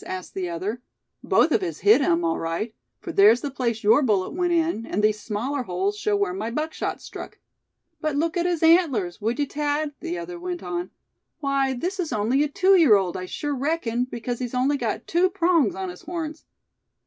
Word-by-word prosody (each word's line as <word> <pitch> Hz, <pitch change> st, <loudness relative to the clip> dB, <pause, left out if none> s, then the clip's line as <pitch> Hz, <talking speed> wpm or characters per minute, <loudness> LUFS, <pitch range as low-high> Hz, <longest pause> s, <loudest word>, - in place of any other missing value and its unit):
asked 185 Hz, -1 st, -6 dB
the 185 Hz, -2 st, -3 dB
other; 195 Hz, +8 st, -4 dB, 0.4 s
"both -, -, +3 dB
of -, -, +3 dB
us 360 Hz, -3 st, -4 dB
hit 410 Hz, -7 st, +6 dB
him, 170 Hz, -9 st, +2 dB
all 165 Hz, -, 0 dB
right; 165 Hz, +7 st, -3 dB, 0.3 s
for -, -, -6 dB
there's 215 Hz, +5 st, +6 dB
the 285 Hz, -, -4 dB
place 235 Hz, -4 st, -2 dB
your 225 Hz, +7 st, +5 dB
bullet 205 Hz, -8 st, +1 dB
went 350 Hz, +1 st, 0 dB
in; 330 Hz, -8 st, +1 dB
and 210 Hz, -, -2 dB
these 215 Hz, 0 st, +3 dB
smaller 250 Hz, +6 st, -2 dB
holes 195 Hz, -1 st, -1 dB
show 210 Hz, 0 st, 0 dB
where 200 Hz, -3 st, 0 dB
my 210 Hz, +4 st, -3 dB
buckshot 305 Hz, +6 st, -3 dB
struck." -, -, -9 dB, 0.6 s
"But 310 Hz, -2 st, -1 dB
look 320 Hz, +3 st, 0 dB
at 350 Hz, 0 st, +1 dB
his 345 Hz, -2 st, -1 dB
antlers, 275 Hz, -, +3 dB
would 225 Hz, +4 st, -1 dB
you, 290 Hz, -, +1 dB
Thad?" 295 Hz, +1 st, -2 dB
the 345 Hz, +1 st, -4 dB
other 350 Hz, 0 st, -6 dB
went 355 Hz, 0 st, -5 dB
on; 350 Hz, 0 st, -3 dB, 0.5 s
"why, 275 Hz, -2 st, 0 dB
this 365 Hz, +9 st, -3 dB
is 335 Hz, -5 st, -2 dB
only 230 Hz, +5 st, +1 dB
a 300 Hz, -, +2 dB
two 385 Hz, +6 st, +4 dB
year 310 Hz, -, +7 dB
old, 190 Hz, -3 st, 0 dB
I 185 Hz, 0 st, -5 dB
sure 290 Hz, +9 st, -3 dB
reckon, 255 Hz, -4 st, -1 dB
because 240 Hz, -1 st, -5 dB
he's 245 Hz, -1 st, -4 dB
got -, -, -1 dB
only 280 Hz, +2 st, +1 dB, 0.3 s
two 355 Hz, +2 st, +2 dB
prongs 345 Hz, -, +2 dB
on 190 Hz, -1 st, -4 dB
his 180 Hz, -, -10 dB
horns." 320 Hz, -2 st, -6 dB
270 Hz, 205 wpm, -24 LUFS, 210-330 Hz, 0.6 s, year